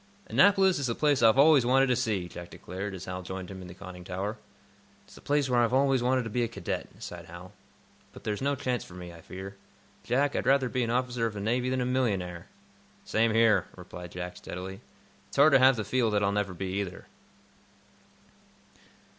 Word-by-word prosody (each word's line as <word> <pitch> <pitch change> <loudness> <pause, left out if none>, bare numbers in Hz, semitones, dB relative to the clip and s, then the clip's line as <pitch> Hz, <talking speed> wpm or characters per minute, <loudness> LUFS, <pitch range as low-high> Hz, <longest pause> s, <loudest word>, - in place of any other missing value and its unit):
"Annapolis 195 -4 +4
is 140 - -1
the 115 - -1
place 145 -4 +2
I've 115 +2 +5
always 145 -1 +6
wanted 130 +2 +4
to 125 -2 +2
see," 110 -7 -1
Jack 85 0 -9
declared, 95 +2 -6
as 95 0 -8
Hal 90 0 -5
joined 95 +1 -7
him 95 -1 -8
in 90 - -9
the 85 - -11
conning 90 -1 -10
tower. 95 +4 -4 0.7
"It's - - -18
the - - -14
place 145 -1 +1
where 125 -2 +2
I've 120 +1 +2
always 135 -1 +3
wanted 130 +1 +2
to 115 - -5
be 125 - 0
a 120 - +1
cadet," 115 - -4
sighed - - -8
Hal. 85 +2 -11 0.6
"But - - -13
there's 105 +1 -3
no 140 +1 +1
chance 125 -2 -2
for 90 - -13
me, 90 -1 -9
I 85 - -13
fear. 95 +3 -9 0.5
Jack, 140 +4 +1
I'd - - -1
rather 135 -2 +3
be 125 - -1
an 115 - -1
officer 120 -1 0
of 110 - -7
the - - -4
Navy 120 +5 0
than 130 0 0
a - - 0
millionaire." 100 -9 -1 0.6
"Same 115 +1 +2
here," 115 -2 +4
replied 90 -1 -10
Jack, 90 0 -6
steadily. 95 +2 -7 0.5
"It's - - -11
hard 145 +2 +6
to 135 - +7
have 130 +1 +6
to 110 - -2
feel 115 +2 +1
that 105 -1 +1
I'll 100 - +2
never 100 -2 -1
be 95 +2 -3
either." 90 -2 -7
115 Hz, 215 wpm, -28 LUFS, 95-130 Hz, 0.7 s, to